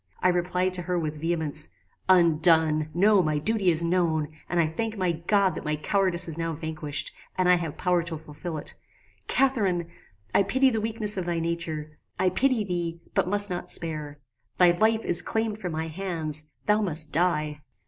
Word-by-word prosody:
I 185 - +3
replied 180 +1 0
to 180 - 0
her 180 0 -2
with 155 -2 -4
vehemence 160 -2 0 0.4
"Undone! 160 -3 +5
No; 200 +4 +4
my 155 -3 0
duty 200 +4 +1
is 165 0 +2
known, 165 -3 0 0.2
and 175 - 0
I 165 - +4
thank 220 +8 -3
my 185 -2 +1
God 190 +4 +1
that - - -6
my 150 0 -1
cowardice 185 +2 0
is 165 0 -4
now 165 0 -2
vanquished, 155 -2 -4 0.3
and 185 -1 +2
I 180 - +6
have 165 -4 -5
power 180 -1 +1
to 170 -1 -3
fulfil 160 +2 -7
it. 150 - -4 0.5
Catharine! 200 -11 +1 0.4
I - - +5
pity 260 +7 +2
the 220 -2 -1
weakness 215 -2 0
of 185 - -2
thy 170 -1 -1
nature: 160 -2 -4 0.2
I 185 - +2
pity 255 +1 +2
thee, 170 -3 -3
but - - +1
must 205 0 +5
not 180 0 -4
spare. 155 -3 -3 0.4
Thy 180 -1 +6
life 220 +5 +1
is 175 - +4
claimed 220 -1 -2
from 180 -5 -4
my 160 +1 -3
hands: 160 -3 -2 0.2
thou 210 +1 +3
must 155 -6 -1
die!" 150 -3 0
175 Hz, 185 wpm, -26 LUFS, 155-190 Hz, 0.5 s, I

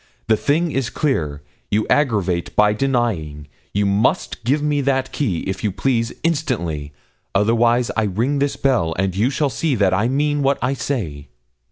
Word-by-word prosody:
The 110 - +4
thing 160 +8 +1
is 135 -4 -1
clear; 75 - -1 0.3
you 105 +1 +1
aggravate 100 - +1
by 105 0 +4
denying; 105 - -1 0.2
you 100 0 +1
must 100 +3 0
give 140 +5 +1
me 145 -1 +1
that 135 -1 0
key, 100 - -1
if 95 +2 -4
you 105 - +1
please, 115 +2 0
instantly, 105 - -1 0.4
otherwise 115 +4 +3
I 110 - +1
ring 115 +9 0
this 140 0 0
bell, 120 -13 +1
and 95 0 0
you 110 +6 +2
shall 140 0 0
see 155 -1 0
that 100 -4 +2
I 105 +5 +2
mean 145 +3 +1
what 140 0 +2
I 125 +3 0
say.' 85 - -4
115 Hz, 170 wpm, -20 LUFS, 95-140 Hz, 0.4 s, The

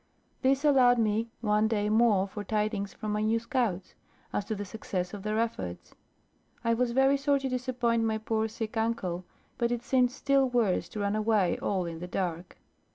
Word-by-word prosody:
This 270 +2 +2
allowed 255 -4 +5
me 220 0 +1
one 210 -1 +2
day 210 -2 0
more 215 -3 +3
for 205 +1 -6
tidings 210 -1 -1
from 215 - -5
my 210 0 0
new 220 +1 +2
scouts, 230 -6 -2 0.4
as 205 - 0
to 220 - -3
the 205 0 -5
success 185 -3 -4
of 205 - -6
their 215 +2 -2
efforts. 95 - -3 0.7
I 230 -1 +2
was 245 +1 +1
very 270 +3 +4
sorry 280 0 +1
to 270 - -2
disappoint 245 -2 0
my 220 -1 +1
poor 220 0 -1
sick 220 0 -5
uncle, 190 -6 -1 0.3
but 235 0 +1
it 240 0 -2
seemed 250 0 +3
still 275 0 +2
worse 220 -8 +1
to 215 - -6
run 200 +1 0
away 215 -4 +2
all 190 -3 -1
in 165 -1 -6
the 180 - -6
dark. 180 -1 -3
220 Hz, 190 wpm, -29 LUFS, 200-240 Hz, 0.7 s, allowed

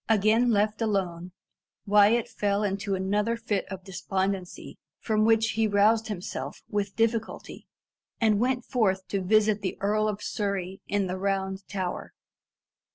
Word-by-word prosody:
Again 220 +3 +4
left 215 0 +1
alone, 185 -5 -1 0.5
Wyat 210 +3 +4
fell 205 0 -1
into 200 0 -1
another 205 +5 0
fit 220 -4 -2
of 190 -2 -7
despondency 190 0 -3 0.2
from 215 -1 +1
which 225 0 +3
he 220 0 +1
roused 215 +2 +3
himself 195 -4 -6
with 200 -1 -2
difficulty, 225 0 -2 0.5
and 215 -3 +3
went 250 +1 0
forth 190 -7 0
to 195 - -1
visit 210 +2 +3
the 190 - -3
Earl 215 +2 +1
of 210 -1 -3
Surrey 195 -2 -3
in 205 0 0
the 185 0 -4
Round 190 0 -1
Tower. 185 -3 -4
205 Hz, 140 wpm, -27 LUFS, 195-220 Hz, 0.5 s, Again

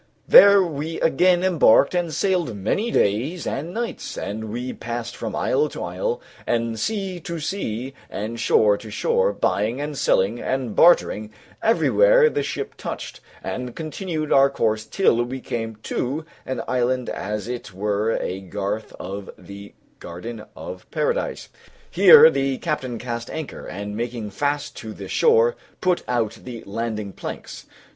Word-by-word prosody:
There 200 -1 +9
we 160 -1 -4
again 175 +3 +3
embarked 170 -7 +5
and 175 -2 0
sailed 175 - 0
many 110 - -1
days 135 - 0
and 155 +6 -3
nights, 235 +4 -4
and 110 +2 -4
we 125 +3 -4
passed 120 0 -5
from - - -5
isle 460 -3 +1
to - - -6
isle - - -2 0.3
and 115 -1 0
sea 195 - -2
to 170 -2 -5
sea 135 - -3 0.2
and 110 +3 -5
shore 105 -2 +3
to 110 - -10
shore, 475 - +1
buying 110 - 0
and 145 0 -4
selling 110 -2 +2
and 130 -4 -2
bartering 110 -11 +4 0.3
everywhere - - +4
the - - 0
ship 425 - -4
touched, - - -6 0.2
and 125 -1 -5
continued 160 -1 -3
our 135 0 +6
course 110 -5 0
till 155 -12 +2
we 130 +2 -5
came 115 -3 -4
to 145 +6 -2 0.2
an 130 - -3
island 125 0 0
as 105 +2 -4
it 120 -3 -5
were 105 +3 0
a 95 +1 -3
garth 100 +3 -4
of 100 +2 -6
the 100 +2 -11 0.2
garden 105 +6 -7
of - - -9
Paradise. 485 +1 -2 0.4
Here 470 0 +9
the 135 -1 0
captain 130 -7 -3
cast 120 0 -5
anchor, 160 -3 -6
and 100 +2 -6
making 115 -2 -4
fast 145 +6 -2
to 110 -2 -7
the - - -8
shore, 470 +1 +4 0.2
put 180 -1 +1
out 120 -3 -1
the 120 -3 -8
landing 105 -1 -4
planks. - - -8
125 Hz, 150 wpm, -23 LUFS, 110-175 Hz, 0.4 s, There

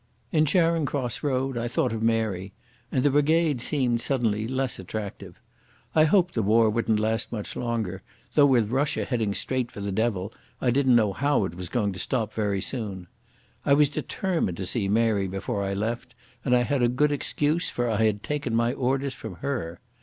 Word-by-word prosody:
In 155 -1 +3
Charing 165 -1 +2
Cross 130 -5 -2
Road 135 -3 -1
I 120 - -2
thought 120 -2 0
of 110 - -3
Mary, 110 -4 0 0.4
and 130 - +1
the 145 - +4
brigade 150 -1 +2
seemed 125 -4 0
suddenly 110 -6 0
less 130 0 -2
attractive. 100 +2 -7 0.5
I 155 -1 +5
hoped 180 +2 +3
the 115 - 0
war 110 +2 +4
wouldn't 110 -1 +1
last 110 +1 0
much 105 -3 -5
longer, 110 -6 -2 0.3
though 145 -2 +6
with 120 -5 +3
Russia 140 +3 0
heading 110 -6 -1
straight 130 -2 -1
for - - -9
the 100 0 -3
devil 105 -1 -1 0.3
I 125 - +2
didn't 130 -1 +4
know 105 -4 +3
how 140 -2 +1
it 85 - -5
was 90 0 -6
going 105 -5 0
to 95 - -7
stop 110 -2 -1
very 100 -3 -1
soon. 100 -8 -4 0.6
I 140 - +3
was 145 -1 +4
determined 160 - -2
to 95 - -3
see 100 +2 -1
Mary 105 -2 +2
before 95 +1 -3
I 100 0 -2
left, 115 +4 -3 0.3
and 125 -2 +3
I 120 - +3
had 140 +1 0
a 120 - +4
good 145 +5 +2
excuse, 150 +3 0
for 120 0 -1
I 110 -1 +1
had 105 -1 +1
taken 145 -6 -2
my 115 +1 +2
orders 135 +1 -1
from 110 -6 -8
her. 85 -7 -4
120 Hz, 195 wpm, -26 LUFS, 105-135 Hz, 0.6 s, though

